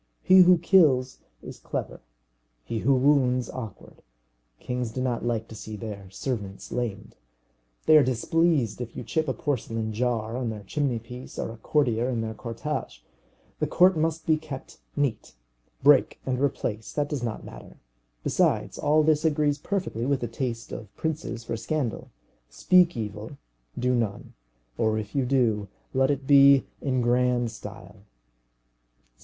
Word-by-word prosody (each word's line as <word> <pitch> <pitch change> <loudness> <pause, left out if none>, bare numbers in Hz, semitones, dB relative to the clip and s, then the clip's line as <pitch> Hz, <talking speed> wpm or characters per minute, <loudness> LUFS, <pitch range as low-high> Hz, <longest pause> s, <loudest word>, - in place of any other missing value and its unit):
He 185 0 +7
who 180 0 +7
kills 155 -8 +3 0.2
is - - -9
clever, - - -5 0.6
he 110 - -3
who 135 +5 +3
wounds 130 -2 +2
awkward. 115 -7 -9 0.6
Kings 125 -1 -3
do 115 - -6
not 125 -2 -1
like 115 -2 -1
to - - -9
see 110 0 -8
their 100 -3 -7
servants 100 -2 -5
lamed. 115 -4 -4 0.7
They 155 - +7
are 150 - +6
displeased 130 - +1
if 120 -1 -7
you - - -4
chip 160 -1 -1
a 130 - 0
porcelain 115 -7 -2
jar 115 -1 -1
on 125 -2 -2
their 105 -2 -6
chimney 135 +3 -1
piece 125 +3 -10
or - - -3
a 115 - -10
courtier 120 -2 +1
in 120 -3 -1
their 110 0 -3
cortège. 120 +7 -5 0.6
The - - 0
court 185 +1 +5
must 160 0 -1
be 160 -1 +3
kept 150 -4 -9 0.2
neat. 140 - -2 0.5
Break 140 -1 +5
and 130 -1 -1
replace; 110 -6 -2
that 145 -1 0
does 145 -4 -3
not 115 -3 -4
matter. - - -12 0.5
Besides, - - +1
all 155 +1 +3
this 155 0 +2
agrees 150 -2 +1
perfectly 160 - -2
with 140 -1 +1
the 120 - -2
taste 115 0 -4
of 105 -3 -8
princes 150 -7 -3
for 115 - -3
scandal. 120 +2 -3 0.4
Speak 175 - +3
evil, 110 +4 -6 0.4
do 125 +1 +1
none; 115 -5 -2 0.5
or 110 -1 +2
if 105 -1 -5
you 135 -2 +1
do, 115 -6 +1 0.3
let 130 +1 +3
it 140 -1 -1
be 140 -1 +7 0.2
in 130 -3 0
grand 120 -1 +2
style. 105 -2 -10
125 Hz, 155 wpm, -26 LUFS, 115-145 Hz, 0.7 s, He